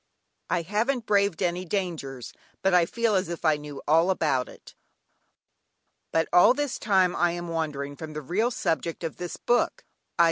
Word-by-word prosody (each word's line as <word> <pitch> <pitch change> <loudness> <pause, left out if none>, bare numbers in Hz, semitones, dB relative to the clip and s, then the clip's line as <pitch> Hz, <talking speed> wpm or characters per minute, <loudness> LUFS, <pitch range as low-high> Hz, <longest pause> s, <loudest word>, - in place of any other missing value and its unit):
"I 175 -2 0
haven't 220 +7 -1
braved 200 -4 +2
any 175 +1 0
dangers, 165 - -4 0.3
but 190 - +3
I 175 -2 +5
feel 230 +1 0
as 185 -2 +1
if 170 0 -5
I 155 -1 +5
knew 145 -1 -9
all 165 +4 +4
about 140 - +1
it" - - -15 1.4
(Rudyard 160 0 +2
Kipling.) - - -22
But - - +4
all 220 +7 +7
this 290 -2 -2
time 190 -4 +2
I 175 0 +2
am 175 0 -5
wandering 150 -4 -3
from 155 +1 -8
the 150 0 -6
real 205 - +1
subject 165 -7 -2
of 165 - -4
this 175 -1 -5
book, 240 0 0 0.3
_i. - - -23
175 Hz, 185 wpm, -26 LUFS, 160-200 Hz, 1.4 s, all